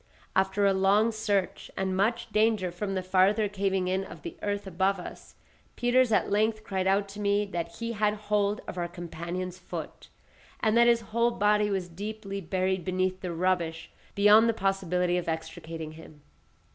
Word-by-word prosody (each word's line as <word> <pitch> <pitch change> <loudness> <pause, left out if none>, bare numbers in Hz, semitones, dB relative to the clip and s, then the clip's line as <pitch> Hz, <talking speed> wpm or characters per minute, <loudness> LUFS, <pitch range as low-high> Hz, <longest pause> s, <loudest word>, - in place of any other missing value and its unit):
After 190 +1 +2
a 195 - +4
long 200 +4 +3
search, 205 -3 -1
and 190 -1 -1
much 230 +4 0
danger 215 -4 +2
from 195 +2 -3
the 185 - -1
farther 190 +3 +3
caving 195 -2 -1
in 190 +1 0
of - - -11
the 340 +1 -6
earth 205 0 -2
above 190 +1 0
us, - - -10 0.4
Peters 245 0 +3
at 210 - +2
length 215 +1 +1
cried 190 -2 -2
out 200 +1 +2
to 200 +1 -9
me 205 0 +1
that 170 -4 -5
he 230 0 -4
had 210 -1 +1
hold 210 0 0
of 180 - -5
our 175 - -1
companion's 175 +1 -6
foot, 180 - -8 0.5
and 220 0 +2
that 235 0 +6
his 235 -1 +4
whole 235 +1 +3
body 210 -2 +2
was 190 -3 -1
deeply 200 +2 -6
buried 185 +1 -1
beneath 185 +1 -1
the 180 - -3
rubbish 170 -2 -1 0.2
beyond 210 +3 +6
the - - +2
possibility 180 -3 0
of 175 - -4
extricating 160 0 -5
him. 155 -2 -14
195 Hz, 175 wpm, -28 LUFS, 185-210 Hz, 0.5 s, that